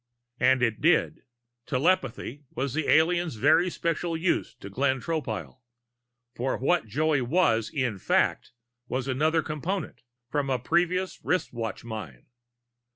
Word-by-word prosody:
And 130 0 +4
it 115 -2 0
did. 165 0 +2 0.4
Telepathy 140 -2 0
was 135 +1 -2
the 155 0 -1
alien's 165 -1 +3
very 155 +10 +4
special 170 0 -2
use 170 +2 0
to - - -10
Glenn 130 +6 0
Tropile, 135 - -4 0.7
for 130 +2 -1
what 145 +1 +1
Joey 150 +4 +1
was 120 -5 +2
in 125 -8 -2
fact - - +1 0.4
was 130 +1 -2
another 155 +5 +1
Component, 165 +6 -4 0.3
from 140 +1 -1
a 130 - +2
previous 175 +7 0
wristwatch 120 -11 -2
mine. 105 - -7
140 Hz, 125 wpm, -27 LUFS, 125-165 Hz, 0.7 s, And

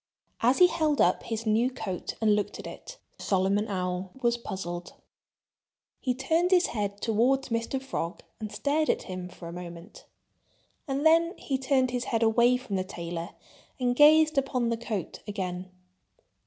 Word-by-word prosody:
As 245 +3 +4
he 360 - +8
held 315 -4 +1
up - - +4
his 225 0 -4
new 225 +3 +3
coat 220 -8 -5
and 215 -2 +4
looked 210 - -2
at - - -9
it, - - -9 0.2
Solomon 195 +2 +1
Owl 185 -1 -2
was 240 -2 +2
puzzled. 180 -6 -6 1.1
He 250 -1 -1
turned 325 +7 +1
his 365 -1 +5
head 205 -2 -2
toward 240 +5 +2
Mr. 230 +3 -1
Frog 235 -10 -4 0.2
and 215 -2 -5
stared 305 +2 0
at - - +1
him 185 -1 -6
for 170 - -10
a 170 - -7
moment. 175 +2 -10 0.8
And 275 +2 -1
then 335 +3 +5
he 270 -2 -2
turned 260 -1 +2
his 245 0 -2
head 230 0 0
away 235 +2 +4
from 210 -6 -4
the 185 - 0
tailor 170 -2 -6 0.4
and 245 -1 +1
gazed 310 +1 +6
upon 255 -3 -1
the 230 - +1
coat 220 -6 -4
again. 185 -3 -4
230 Hz, 165 wpm, -28 LUFS, 190-270 Hz, 1.1 s, he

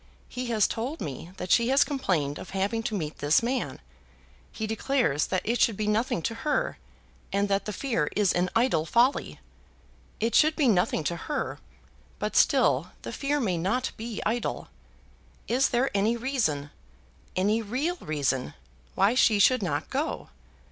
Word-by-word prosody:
He 250 0 -5
has 220 -4 +3
told 255 +8 -4
me 155 +1 -6
that 180 -1 -5
she 235 -1 +4
has 270 +2 +5
complained 180 - -1
of - - -9
having 205 +4 0
to 220 -1 -3
meet 155 -4 -5
this 145 +9 +3
man. 250 +2 -2 0.7
He 220 - -4
declares 220 - 0
that 185 - -1
it 235 +1 0
should 220 -4 +3
be 215 - -1
nothing 215 - 0
to 230 - -1
her, 300 - -1 0.5
and 200 +1 +1
that 195 0 +1
the 210 - -3
fear 210 - -1
is 205 -3 +3
an 180 +1 +1
idle 225 -9 +2
folly. 245 - +2 0.8
It 230 +1 0
should 310 +4 +5
be 295 -5 +2
nothing 180 -6 +2
to 170 - -1
her, 290 - -4 0.6
but - - -3
still - - +3
the - - -6
fear 290 +1 -1
may 185 -9 0
not 235 +9 0
be 225 -1 -5
idle. 235 +1 -2 0.8
Is 255 +3 +2
there 250 +3 +1
any 215 +4 +2
reason, 220 - -1 0.6
any 210 +5 +2
real 265 - -2
reason, 140 - -2 0.4
why 200 +4 +3
she 230 -4 +4
should 255 +5 +4
not 150 -5 -2
go? - - -2
220 Hz, 165 wpm, -27 LUFS, 180-255 Hz, 0.8 s, has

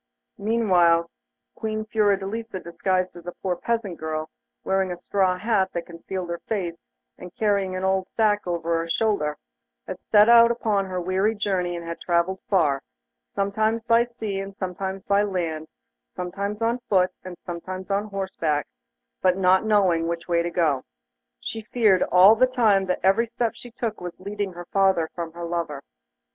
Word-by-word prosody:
Meanwhile, 180 -7 +3 0.4
Queen 215 0 -3
Fiordelisa, 210 0 0
disguised 185 +1 -1
as 175 0 -12
a 175 - -4
poor 185 -2 0
peasant 210 -2 -2
girl, 155 0 -4 0.3
wearing 190 0 +1
a 180 - -3
great 175 - -21
straw 190 -2 +1
hat 195 -2 +1
that 170 - -3
concealed 175 +1 -6
her 170 - -4
face, 180 -6 -3 0.3
and 180 0 -10
carrying 200 -3 +1
an 185 - -3
old 190 0 +1
sack 210 -3 +1
over 170 -1 0
her 165 0 -4
shoulder, 180 -7 0 0.5
had - - -6
set 210 0 +5
out 235 0 +8
upon 215 -4 0
her 185 -1 -3
weary 190 +5 +1
journey, 185 -4 -1
and 170 -1 -6
had 170 - -6
travelled 175 +2 +1
far, 150 -9 +2 0.5
sometimes 215 +3 0
by 230 0 +4
sea 225 -5 -5
and 195 0 -6
sometimes 190 0 -4
by 200 0 +3
land; 170 -6 -2 0.5
sometimes 200 +4 -4
on 235 +2 +1
foot, 185 -2 +3
and 185 -1 -8
sometimes 185 +2 -6
on 200 +1 +1
horseback, 190 -7 -2 0.6
but 185 0 +3
not 190 +2 +4
knowing 185 -6 +3
which 170 0 -4
way 170 -1 +2
to 170 - -2
go. 155 -6 +1 0.6
She 225 - -5
feared 215 -4 +3
all 185 +4 +7
the 255 +3 +4
time 215 -6 +2
that 180 - -1
every 195 +5 +3
step 235 0 -1
she 245 - -11
took 225 -3 -4
was 175 -1 -7
leading 200 0 -4
her 175 0 -8
farther 190 -4 +2
from 170 -2 -5
her 170 0 -6
lover. 165 -5 -3
190 Hz, 170 wpm, -24 LUFS, 175-210 Hz, 0.6 s, out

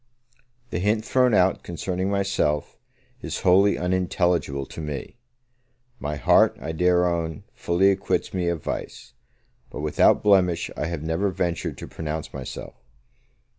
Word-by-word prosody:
The - - -1
hint 105 +3 +1
thrown 125 -2 +3
out 90 0 +3
concerning 90 +2 -3
myself 95 -7 0 0.5
is - - -4
wholly 95 +3 +4
unintelligible 90 -5 0
to 80 - -9
me: 75 +8 -6 0.8
my 75 +1 -3
heart, 75 - +4
I 80 - -4
dare 90 +2 +3
own, 85 +2 -2
fully 95 0 +2
acquits 95 0 -1
me 90 -2 -1
of 85 -3 -2
vice; - - -6 0.6
but - - -7
without 75 0 +3
blemish, 90 -4 +3
I 75 - -2
have 85 -3 -4
never 80 +5 0
ventured 85 -2 -2
to - - -8
pronounce 80 -1 -5
myself. - - -7
90 Hz, 135 wpm, -24 LUFS, 80-95 Hz, 0.8 s, wholly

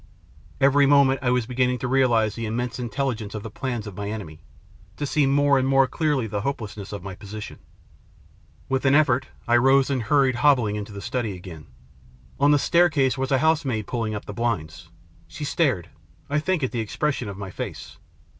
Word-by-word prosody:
Every 140 +1 +4
moment 140 -1 +4
I 125 - 0
was 125 -2 +1
begin 125 +1 +1
ning 125 - -1
to 125 - -3
realise 120 -5 +2
the 115 0 -4
immense 120 +3 -3
intelligence 120 -4 -3
of 105 - -5
the 110 - -7
plans 120 -3 -4
of 100 -3 -8
my 100 +1 -4
enemy, 90 -8 -7 0.6
to 145 - -2
see 145 0 +2
more 140 0 +3
and 130 - 0
more 135 0 +4
clearly 145 -3 0
the 105 -2 -3
hopelessness 105 -5 -5
of 100 -3 -6
my 95 -1 -6
position. 105 +2 -9 1.1
With 130 0 -1
an 135 +1 +5
effort 135 -3 +3 0.2
I 120 0 +5
rose 135 +2 +4
and 130 -3 0
hurried 130 +2 +2
hobbling 125 -6 +3
into 105 0 -5
the 100 -1 -8
study 115 -3 -2
again. 85 -4 -11 0.7
On 145 - +4
the 145 - +5
staircase 145 -5 +3
was 135 +1 -3
a 135 - +4
housemaid 140 -7 +1
pulling 115 -2 -3
up 105 - -6
the 105 - -7
blinds. 85 -8 -3 0.4
She 150 - -8
stared, 130 - 0 0.4
I 150 - +2
think, 175 0 -1
at 130 - 0
the 120 - -3
expression 120 +2 -2
of 100 - -7
my 95 -2 -7
face. - - -7
125 Hz, 195 wpm, -24 LUFS, 105-140 Hz, 1.1 s, an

